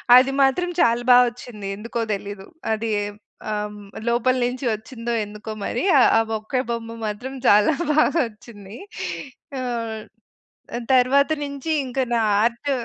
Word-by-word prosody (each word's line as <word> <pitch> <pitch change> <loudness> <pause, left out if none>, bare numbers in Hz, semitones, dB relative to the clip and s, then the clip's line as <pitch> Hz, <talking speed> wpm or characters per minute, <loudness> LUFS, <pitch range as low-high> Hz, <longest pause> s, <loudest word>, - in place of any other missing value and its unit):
అది 260 +2 +6
మాత్రం 275 +7 +2
చాలా 235 +1 +3
బావొచ్చింది. 245 -4 +2
ఎందుకో 230 +2 -5
తెలీదు. 200 -1 -6 0.3
అది 220 +1 -2 0.6
ఆ! - - 0
హ్మ్. 205 -1 -11 0.2
లోపల 245 +2 +2
నుంచి 255 +2 -3
వచ్చిందో 230 +2 -5
ఎందుకో 210 +1 -8
మరి - - -2 0.2
ఆ! - - +7 0.2
ఆ - - +5 0.2
ఒక్కే 235 +4 -2
బొమ్మ 230 0 -4
మాత్రం 245 +6 -5
చాలా 210 +8 +6 0.2
బాగా 310 +2 +3
వచ్చింది. 210 -1 -13 0.8
ఆ! - - -3 1.3
తరువాత 275 +4 +4
నుంచి 280 +3 -5
ఇంకా 260 +1 -1
నా 230 - +2 0.2
ఆర్ట్ 240 +5 0
235 Hz, 130 wpm, -22 LUFS, 215-260 Hz, 1.3 s, ఆ